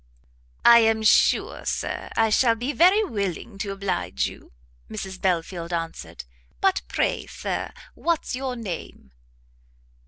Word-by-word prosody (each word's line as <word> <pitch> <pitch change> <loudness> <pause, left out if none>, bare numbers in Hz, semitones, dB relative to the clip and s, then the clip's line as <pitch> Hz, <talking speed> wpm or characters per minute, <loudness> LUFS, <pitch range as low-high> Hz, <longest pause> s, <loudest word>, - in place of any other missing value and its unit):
"I 235 0 +9
am 225 -1 +2
sure, 215 - +3
Sir, - - -3
I 225 -1 +3
shall 230 +1 +4
be 245 +6 -3
very 370 +7 +5
willing 200 - -4
to 205 -2 -3
oblige 190 - -2
you," - - -9 0.4
Mrs 190 -1 -6
Belfield 175 -1 -1
answered; 165 - -5 0.4
"but 385 -1 +2
pray, - - -1
Sir, - - -4 0.2
what's 335 -6 -1
your 260 -1 -3
name?" 185 - -7
215 Hz, 125 wpm, -24 LUFS, 180-250 Hz, 0.4 s, I